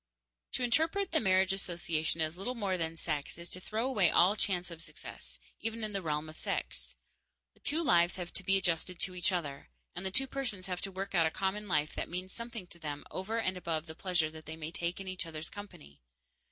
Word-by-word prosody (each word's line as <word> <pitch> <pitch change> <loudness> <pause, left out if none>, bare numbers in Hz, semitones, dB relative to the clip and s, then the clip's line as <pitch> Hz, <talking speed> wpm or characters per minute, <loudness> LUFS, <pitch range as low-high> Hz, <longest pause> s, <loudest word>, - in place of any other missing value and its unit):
_ - - -31
To 255 - +1
interpret 320 +11 +2
the 320 - +5
marriage 190 -2 +4
association 170 -4 0
as 155 +1 +1
little 235 +8 -2
more 200 -5 +1
than 165 -2 -2
sex 150 -3 -2
is 170 0 -7
to 185 - -2
throw 220 +5 -1
away 205 -10 +5
all 185 +4 +6
chance 180 -4 0
of 165 -1 -8
success, - - -7 0.2
even 225 +1 -2
in 215 -1 -2
the 195 - 0
realm 150 -2 -1
of 155 - -9
sex. - - -2 0.6
The - - -25
two 315 +4 +2
lives 175 - +5
have 175 -2 -5
to - - 0
be 195 +1 +5
adjusted 180 -1 +1
to 185 - 0
each 180 +3 +2
other, 145 -6 -2 0.3
and 180 - -2
the 190 - +1
two 265 +8 +3
persons 250 -8 -2
have 180 -2 -2
to 195 - -2
work 195 +1 -4
out 165 -3 +5
a - - +2
common 195 +4 -1
life 150 -4 +2
that - - -3
means 185 +2 -3
something 230 -4 -4
to 170 -1 -13
them 145 -3 -4
over 205 +5 -1
and 190 -5 +1
above 165 -3 -1
the 160 - -7
pleasure 170 -2 +1
they 160 0 -7
may 160 0 -5
take 170 +2 -2
in 195 - -6
each 185 -2 -2
other's 160 0 -4
company. 70 - -10
180 Hz, 230 wpm, -33 LUFS, 165-200 Hz, 0.6 s, all